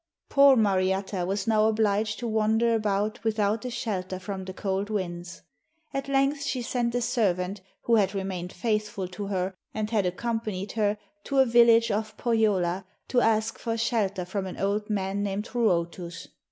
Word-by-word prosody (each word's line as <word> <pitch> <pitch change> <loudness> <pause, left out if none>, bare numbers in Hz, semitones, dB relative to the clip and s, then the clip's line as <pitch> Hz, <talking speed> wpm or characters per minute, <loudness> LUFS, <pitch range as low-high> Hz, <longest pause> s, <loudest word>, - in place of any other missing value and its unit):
Poor 280 -1 +7
Mariatta 190 -3 +1
was 195 +1 -1
now 215 -1 +3
obliged 215 -1 +1
to 240 - -4
wander 220 +1 +2
about 215 +1 0
without 215 0 0
a - - -2
shelter 190 -6 -3
from 190 0 -6
the 190 - -5
cold 195 +2 -2
winds. 175 -4 -4 0.5
At 275 0 -3
length 275 +1 +2
she 260 -3 -2
sent 235 0 -1
a 245 - +1
servant, 200 -5 0 0.2
who 230 -1 +4
had 200 -1 +2
remained 185 -2 -3
faithful 210 -2 -2
to 195 +2 -6
her 190 -1 -1 0.2
and 215 0 -2
had 205 -5 +2
accompanied 210 0 -3
her, 210 -1 +1 0.3
to 275 - -2
a 265 - +7
village 235 -1 +5
of 215 +1 -2
Pohjola 200 -6 +1 0.3
to 245 - +3
ask 220 0 +1
for 230 -1 -2
shelter 210 -6 0
from 190 +1 -3
an 185 - -7
old 205 +2 -1
man 195 -1 -1
named 205 +1 -2
Ruotus. 175 -6 -1
210 Hz, 165 wpm, -27 LUFS, 190-230 Hz, 0.5 s, Poor